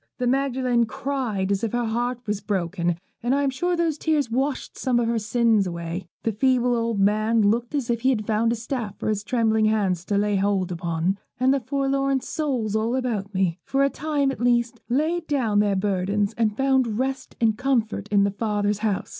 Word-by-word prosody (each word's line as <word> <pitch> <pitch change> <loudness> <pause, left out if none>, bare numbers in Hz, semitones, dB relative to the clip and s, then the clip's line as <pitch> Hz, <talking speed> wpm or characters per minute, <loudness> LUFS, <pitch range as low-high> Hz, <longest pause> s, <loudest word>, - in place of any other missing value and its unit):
The 250 - -1
Magdalen 255 -2 +1
cried 255 -7 -2
as 200 +1 0
if 230 - -1
her 240 0 0
heart 240 +2 -1
was 210 -2 -2
broken, 175 -4 -1 0.2
and 245 +3 +1
I 285 - +1
am 275 - +1
sure 350 +7 0
those 330 -3 0
tears 300 -6 0
washed 265 +3 -1
some 250 -3 +1
of 235 - +1
her 230 0 +1
sins 220 -2 +2
away. 170 +1 -5 0.2
The 225 - +1
feeble 245 +2 +2
old 230 -2 -1
man 215 +3 +3
looked 235 +6 +1
as 275 -5 -1
if 235 -1 -1
he 260 - +3
had 220 -5 0
found 225 +2 +1
a - - +1
staff 230 -3 -4
for - - -2
his 210 -1 -1
trembling 220 -2 +2
hands 200 -5 +1
to 200 - 0
lay 205 0 +1
hold 195 -2 0
upon, 170 +2 -1 0.2
and 260 +1 +4
the 275 - +1
forlorn 275 +1 0
souls 255 -8 -2
all 225 +3 0
about 225 -6 -2
me, 185 -2 +1
for 275 0 +1
a 275 - +2
time 290 -3 0
at 265 - -7
least, 240 -1 +1
laid 320 +6 0
down 235 -8 +1
their 205 -1 +2
burdens 200 +1 0
and 220 -2 0
found 265 -5 +2
rest 260 +1 -3
and 225 -2 +3
comfort 230 -5 0
in 205 -1 +3
their 200 -1 0
Father's 205 -1 -1
house. 210 -3 -1
230 Hz, 205 wpm, -24 LUFS, 205-260 Hz, 0.2 s, and